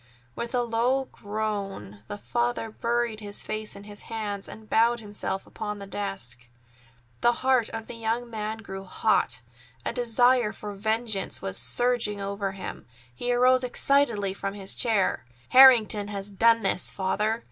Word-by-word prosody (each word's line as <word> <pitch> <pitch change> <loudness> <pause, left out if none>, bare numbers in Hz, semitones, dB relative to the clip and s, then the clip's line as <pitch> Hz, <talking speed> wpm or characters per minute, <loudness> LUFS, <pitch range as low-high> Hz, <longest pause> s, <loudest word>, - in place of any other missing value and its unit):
With 235 +2 -3
a 245 - +2
low 245 +3 +1
groan 205 - -4
the 205 - -5
father 240 0 -2
buried 235 -1 -1
his 205 -1 -3
face 215 0 -5
in 200 - -10
his 205 0 -9
hands 210 -3 -4
and 220 0 -11
bowed 235 +2 +3
himself 205 -2 -4
upon 210 -1 -5
the 200 - -8
desk. 125 - -4 0.7
The 240 - +5
heart 255 -4 +4
of 225 -1 -6
the - - -8
young 230 +1 -2
man 220 -1 -4
grew 195 -1 -7
hot. 185 - +1 0.4
A - - -1
great - - -7
desire 245 -1 +3
for 205 0 -7
vengeance 220 0 -1
was 95 - -2
surging 210 - +2
over 200 0 -3
him. 195 - -8 0.3
He 245 - -2
arose 255 +1 +4
excitedly 245 -6 +2
from 195 0 -4
his 195 -1 -2
chair. 215 - +2 0.3
"Harrington 235 -6 +7
has 200 0 -5
done 230 +2 +4
this, 195 -1 +1
father!" 210 +4 -1
215 Hz, 160 wpm, -26 LUFS, 200-235 Hz, 0.7 s, Harrington